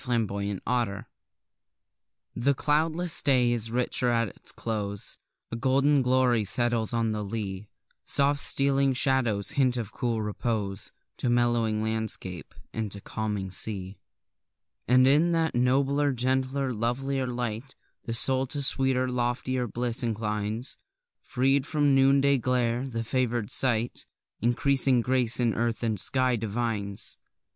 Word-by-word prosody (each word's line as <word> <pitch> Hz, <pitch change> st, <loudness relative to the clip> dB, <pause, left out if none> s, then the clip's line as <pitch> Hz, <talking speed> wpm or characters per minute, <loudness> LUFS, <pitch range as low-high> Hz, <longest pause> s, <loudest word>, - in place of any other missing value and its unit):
Lovecraft 105 Hz, 0 st, -2 dB, 1.3 s
The 135 Hz, +4 st, +1 dB
cloudless 160 Hz, +4 st, +1 dB
day 125 Hz, -3 st, +3 dB
is 115 Hz, -2 st, +2 dB
richer 125 Hz, +1 st, 0 dB
at 115 Hz, -2 st, +1 dB
its -, -, -3 dB
close; 100 Hz, -3 st, -2 dB, 0.4 s
A -, -, -3 dB
golden 135 Hz, +4 st, +2 dB
glory 125 Hz, -3 st, +2 dB
settles 115 Hz, +1 st, 0 dB
on 115 Hz, -2 st, 0 dB
the 105 Hz, -1 st, -3 dB
lea; 100 Hz, -1 st, -5 dB, 0.3 s
Soft 140 Hz, +1 st, +2 dB
stealing 140 Hz, -1 st, +3 dB
shadows 120 Hz, -7 st, +1 dB
hint 130 Hz, -3 st, +1 dB
of 110 Hz, -4 st, -4 dB
cool 115 Hz, -4 st, -2 dB
repose 105 Hz, -2 st, -3 dB, 0.3 s
To 125 Hz, -, -1 dB
mellowing 120 Hz, -3 st, +1 dB
landscape, 110 Hz, -5 st, -2 dB, 0.2 s
and 110 Hz, -2 st, -3 dB
to 100 Hz, -, +1 dB
calming 105 Hz, -2 st, -4 dB
sea. 95 Hz, 0 st, -2 dB, 0.9 s
And 130 Hz, +1 st, +5 dB
in 155 Hz, +5 st, +4 dB
that 165 Hz, -1 st, 0 dB
nobler, 140 Hz, +3 st, +1 dB
gentler, 130 Hz, +1 st, 0 dB
lovelier 130 Hz, +4 st, -2 dB
light, 120 Hz, +1 st, -5 dB, 0.3 s
The 115 Hz, -, -3 dB
soul 130 Hz, +2 st, +3 dB
to 140 Hz, +1 st, -2 dB
sweeter, 130 Hz, -1 st, +1 dB
loftier 125 Hz, 0 st, -2 dB
bliss 120 Hz, +1 st, 0 dB
inclines; 110 Hz, 0 st, -3 dB, 0.4 s
Freed 135 Hz, +2 st, 0 dB
from 150 Hz, -2 st, +1 dB
the 135 Hz, -, +4 dB
noonday 140 Hz, 0 st, +3 dB
glare, 125 Hz, +1 st, 0 dB
the 115 Hz, -3 st, -4 dB
favour'd 120 Hz, -2 st, -1 dB
sight 120 Hz, -2 st, +1 dB, 0.3 s
Increasing 130 Hz, +1 st, +3 dB
grace 125 Hz, -1 st, +1 dB
in 120 Hz, -3 st, +1 dB
earth 115 Hz, +1 st, -2 dB
and 110 Hz, -3 st, -1 dB
sky 130 Hz, +6 st, +2 dB
divines. 105 Hz, -2 st, -3 dB
120 Hz, 130 wpm, -27 LUFS, 110-130 Hz, 1.3 s, And